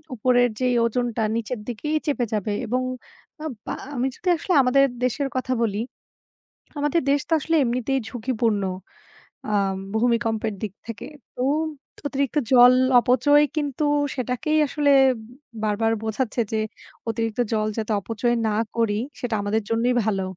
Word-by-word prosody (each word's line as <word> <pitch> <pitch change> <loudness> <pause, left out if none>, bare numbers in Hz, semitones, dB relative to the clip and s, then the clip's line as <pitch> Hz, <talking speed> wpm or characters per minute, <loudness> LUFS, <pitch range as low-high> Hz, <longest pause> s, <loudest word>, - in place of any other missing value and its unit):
উপরের 245 +1 +3
যেই 250 -1 +2
ওজনটা 235 0 -1
নিচের 230 +1 -3
দিকেই 275 +6 -3
চেপে 275 -4 +1
যাবে। 210 0 -1
এবং 250 +3 0 0.6
আব 310 - -3 0.2
আ - - -3 0.2
আমি 255 +1 0
যদি 365 - -2
আসলে 345 +3 -1
আমাদের 275 +2 +4 0.2
দেশের 275 +3 0
কথা 255 0 -1
বলি, 210 -1 -1 1.0
আমাদের 295 +4 +1
দেশ 285 - +3
তো - - -5
আসলে 325 +3 +1
এমনিতেই 255 +2 0
ঝুঁকিপূর্ণ 225 -3 -1 0.9
আম 195 -2 +1 0.2
ভূমিকম্পের 225 -2 +1
দিক 210 -4 -3 0.2
থেকে। 230 -1 -6 0.3
তো 250 - -2 0.7
অতিরিক্ত 280 0 -2 0.2
জল 250 0 +8 0.3
অপচয় 275 +5 +4
কিন্তু 290 -1 -1 0.3
সেটাকেই 255 +4 -1
আসলে 290 0 +1 0.7
বারবার 220 +2 +1
বোঝাচ্ছে 220 +2 -1
যে, 220 - +1 0.5
অতিরিক্ত 225 +1 -2
জল 215 -1 +1
যাতে 220 0 -1
অপচয় 230 +4 -1
না - - 0 0.2
করি, 220 -3 +1 0.2
সেটা 240 -3 -2
আমাদের 210 +2 0
জন্যই 235 +2 +2
ভালো। 200 -3 0
240 Hz, 140 wpm, -23 LUFS, 220-260 Hz, 1.0 s, জল